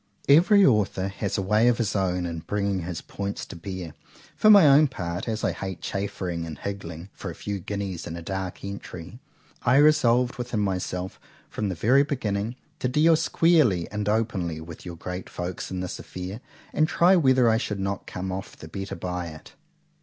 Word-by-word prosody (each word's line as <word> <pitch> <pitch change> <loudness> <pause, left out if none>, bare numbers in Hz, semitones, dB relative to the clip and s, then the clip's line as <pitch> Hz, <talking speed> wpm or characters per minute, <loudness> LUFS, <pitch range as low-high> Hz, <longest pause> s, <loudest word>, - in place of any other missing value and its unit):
——Every 185 +8 +6
author 100 -5 +2
has 100 0 -3
a 95 - 0
way 105 +5 +3
of 120 -2 +4
his 105 -3 -1
own 90 -2 0
in 85 -1 -4
bringing 100 +3 -1
his 85 0 -5
points 100 0 -5
to - - -10
bear;—for 95 - -3
my 200 -7 +9
own 145 +2 +7
part, 90 -7 -5
as 110 -1 -3
I - - +2
hate 95 -2 -5
chaffering 95 -4 -3
and 80 -3 -7
higgling 100 -2 -6
for - - -7
a - - -7
few 100 -1 -4
guineas 95 -1 -4
in 85 - -5
a 85 - -7
dark 95 0 -4
entry;—I 100 +5 -5
resolved 135 -4 +4
within 120 -3 -2
myself, 95 -2 -2 0.3
from 105 -2 -2
the 95 - -3
very 120 +11 +4
beginning, 115 -6 -2 0.2
to - - 0
deal 155 +6 +4
squarely 155 - +3
and 105 0 -2
openly 100 -7 -1
with 80 +2 -10
your 85 - -6
Great 90 +2 -6
Folks 90 +1 -5
in 95 -1 -3
this 90 - -5
affair, 90 +5 -7 0.3
and 155 - +3
try 175 +4 +4
whether 130 -7 +4
I 110 0 +4
should 105 -3 -3
not 95 0 -3
come 95 +1 -4
off 95 +1 -6
the 80 - -10
better 95 +4 -5
by 90 -1 -4
it. 80 -1 -11
100 Hz, 185 wpm, -26 LUFS, 90-120 Hz, 0.3 s, my